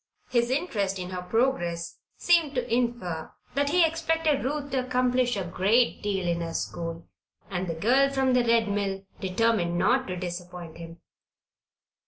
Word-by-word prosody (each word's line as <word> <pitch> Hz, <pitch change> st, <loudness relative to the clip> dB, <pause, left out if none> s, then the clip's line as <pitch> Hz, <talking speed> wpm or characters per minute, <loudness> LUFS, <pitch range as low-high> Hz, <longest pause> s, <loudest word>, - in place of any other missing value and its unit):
His 240 Hz, -1 st, +2 dB
interest 215 Hz, -, -1 dB
in 180 Hz, 0 st, -5 dB
her 180 Hz, -1 st, -4 dB
progress 180 Hz, -6 st, -1 dB, 0.2 s
seemed 335 Hz, -5 st, +3 dB
to 245 Hz, -2 st, -1 dB
infer 235 Hz, -10 st, -1 dB, 0.2 s
that 285 Hz, +2 st, +1 dB
he 350 Hz, +2 st, +5 dB
expected 325 Hz, -2 st, 0 dB
Ruth 285 Hz, +1 st, -3 dB
to 260 Hz, -1 st, 0 dB
accomplish 250 Hz, -2 st, +1 dB
a 195 Hz, -, -1 dB
great 200 Hz, +7 st, +2 dB
deal 195 Hz, -3 st, -1 dB
in 170 Hz, 0 st, 0 dB
her 165 Hz, -1 st, -4 dB
school, 165 Hz, -1 st, -4 dB, 0.4 s
and 185 Hz, 0 st, -2 dB
the 165 Hz, -, -3 dB
girl 255 Hz, +11 st, +3 dB
from 265 Hz, -1 st, +1 dB
the 250 Hz, -1 st, +4 dB
Red 230 Hz, -1 st, +3 dB
Mill 200 Hz, -1 st, -2 dB, 0.2 s
determined 190 Hz, -2 st, +1 dB
not 250 Hz, +9 st, +2 dB
to 185 Hz, -, -3 dB
disappoint 175 Hz, -2 st, -7 dB
him. 165 Hz, 0 st, -10 dB
225 Hz, 160 wpm, -27 LUFS, 180-260 Hz, 0.4 s, he